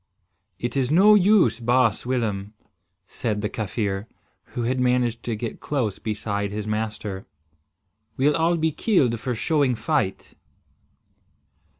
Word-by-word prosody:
"It 120 +2 -4
is 130 -2 +1
no 195 +7 +6
use, 195 - +4
baas 120 -1 +2
Willem," 110 -5 -2 0.5
said 105 0 -3
the 105 - -1
Kaffir, 105 -2 -3 0.5
who 120 - 0
had 130 +2 0
managed 125 -2 +1
to 115 - -1
get 110 +1 -5
close 120 -9 -2
beside 100 -2 -2
his 105 +1 -4
master. 105 -2 -4 0.9
"We'll 160 +5 +2
be 160 0 +1
killed 140 - +1
for 125 +1 -3
showing 140 0 +1
fight." 110 -3 -2
115 Hz, 120 wpm, -24 LUFS, 105-130 Hz, 0.9 s, no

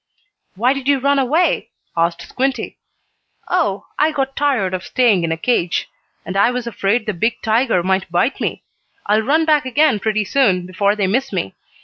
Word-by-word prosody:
"Why 240 +7 +2
did 275 -1 -6
you 285 -1 +4
run 280 +1 +2
away?" 305 +7 +1 0.3
asked 170 0 0
Squinty. 265 +1 -3 0.7
"Oh, 255 - 0
I 305 +1 +3
got 270 -2 -2
tired 255 -11 0
of 185 0 -3
staying 230 -9 +2
in 165 - -1
a 165 - -1
cage. 175 -3 0 0.4
And 185 - -5
I 200 +4 +4
was 250 -1 -3
afraid 225 0 -1
the 215 - -2
big 225 +7 -1
tiger 225 -4 +2
might 190 -1 -1
bite 175 +10 0
me. - - -3 0.4
I'll 210 +2 +2
run 305 +8 +2
back 305 -2 +3
again 260 -3 +2
pretty 215 0 0
soon, 190 -7 +2
before 200 +3 0
they 205 -2 0
miss 260 +8 0
me. 175 - -3
225 Hz, 180 wpm, -18 LUFS, 190-270 Hz, 0.7 s, you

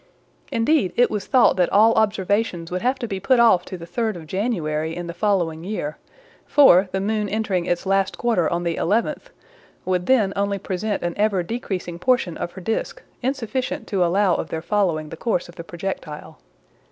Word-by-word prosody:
Indeed 230 - +2
it 245 - +3
was 210 -3 -3
thought 255 -8 +4
that 180 -2 +2
all 220 +3 +5
observations 205 -4 0
would 180 0 -2
have 255 +2 +1
to 240 - -4
be 195 -3 -4
put 255 +4 +3
off 205 -7 +5
to 185 - -7
the 170 - -9
3d 220 +3 -2
of 165 -2 -9
January 160 -5 -2
in 175 - -5
the 170 - -6
following 175 -4 0
year; 175 -6 -4 0.5
for 195 -10 +6
the 190 - -1
moon 210 +1 -1
entering 195 -4 -1
its 175 +2 -1
last 195 0 +1
quarter 225 -9 +1
on 170 0 -1
the 170 -1 -1
11th, 230 - -1 0.6
would 180 -1 -1
then 220 -7 +3
only 200 0 0
present 195 +2 -3
an 175 0 -1
ever 205 -3 +1
decreasing 180 -5 -4
portion 245 -6 +1
of 175 - -5
her 190 - -9
disc, 350 - -3 0.2
insufficient 260 0 -2
to 195 -4 +1
allow 185 +2 +2
of - - -3
their 160 0 -4
following 170 -7 0
the - - -7
course 185 -3 -1
of 175 - -13
the 170 - -8
projectile. 170 - -6
195 Hz, 190 wpm, -22 LUFS, 175-220 Hz, 0.6 s, for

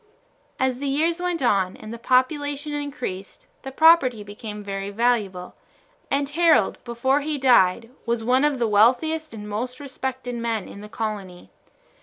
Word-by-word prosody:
As 260 -1 0
years 305 +5 0
went 355 -5 -1
on 195 -5 +1
and 215 - -9
the 235 - -8
population 290 +4 0
increased 275 -10 -6 0.2
the 270 - -7
property 270 -7 +5
became 210 +1 -8
very 195 0 -4
valuable, 205 -5 -1 0.6
and 280 0 0
Harold, 330 +3 +2
before 255 +4 0
he 300 0 -2
died, 230 -4 +3 0.2
was 235 -1 0
one 255 +4 +3
of 295 -2 +2
the 235 -2 +1
wealthiest 260 +10 +2
and 210 -2 -8
most 245 +5 -4
respected 260 -2 -5
men 230 -3 -2
in 200 - -10
the 210 - -10
colony. 205 -5 -6
245 Hz, 150 wpm, -23 LUFS, 210-285 Hz, 0.6 s, property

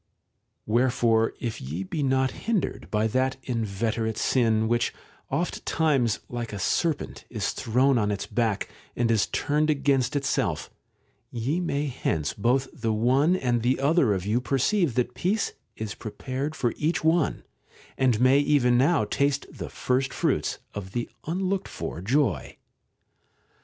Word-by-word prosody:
§ - - -48
o> - - -53 0.6
Wherefore 115 -1 +2
if 115 -2 -4
ye 80 +9 -4
be 145 +11 -3
not 130 -1 +2
hindered 220 -4 -2
by 105 0 +1
that 130 +4 +1
inveterate 110 -1 -1
sin, 110 -4 +2
which 120 0 +1 0.4
oft - - -2
times, 135 -9 +1
like 120 -1 -5
a 105 - -5
serpent, 145 - -1
is 110 -4 -2
thrown 130 +2 +2
on 105 -1 +1
its 100 -1 -2
back, 110 -2 0 0.3
and 120 -1 +1
is 110 -2 +2
turned 150 +1 0
against 140 -2 +2
itself, 130 - -1 0.6
ye 130 +9 -1
may 150 -5 -1
hence 80 - -1
both 125 +6 +1
the 115 -7 -2
one 130 +10 +3
and 125 -8 0
the 125 +3 +1
other 140 - +3
of 95 -1 -4
you 110 +4 +1
perceive 140 - +1
that 125 0 0
peace 195 - 0 0.2
is 110 -2 -4
prepared 130 +6 -4
for 120 -5 0
EPISTOLA - - -14
V 150 - +1
61 - - +4
each 165 - -1 0.3
one, - - -14 0.5
and 125 -5 +2
may 130 +3 +5
even 130 -4 +3
now 140 -4 +3
taste 140 +5 0
the - - -7
first 130 +1 0
fruits - - 0 0.2
of 95 -2 -7
the 120 -1 -3 0.2
unlooked 190 +3 -1
for 85 - -6
joy. 110 - 0
125 Hz, 160 wpm, -26 LUFS, 110-140 Hz, 0.6 s, may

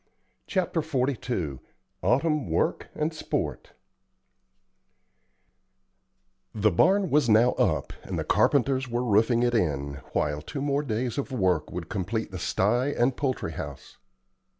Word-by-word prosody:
CHAPTER 180 -3 0
XLII 125 - -2 0.4
AUTUMN 140 - +1
WORK 80 - 0
AND 155 +2 -1
SPORT 155 - -3 2.8
The 105 0 +3
barn 190 - +3
was 145 -4 +3
now 115 +3 +5
up, - - 0
and - - -5
the - - -1
carpenters 130 -2 +2
were 120 +1 -1
roofing 115 +1 +3
it 120 0 +2
in, 70 -9 -1
while 75 0 0
two 135 - -6 0.2
days 120 +1 -2
more 140 - +1
of 135 - -16
work 95 -10 +1
would 85 -1 -5
complete 105 +4 -3
the 90 - -6
sty 120 +9 +1
and 130 -2 +1
poultry 130 - -2
house. 70 -3 -8
120 Hz, 125 wpm, -27 LUFS, 90-135 Hz, 2.8 s, now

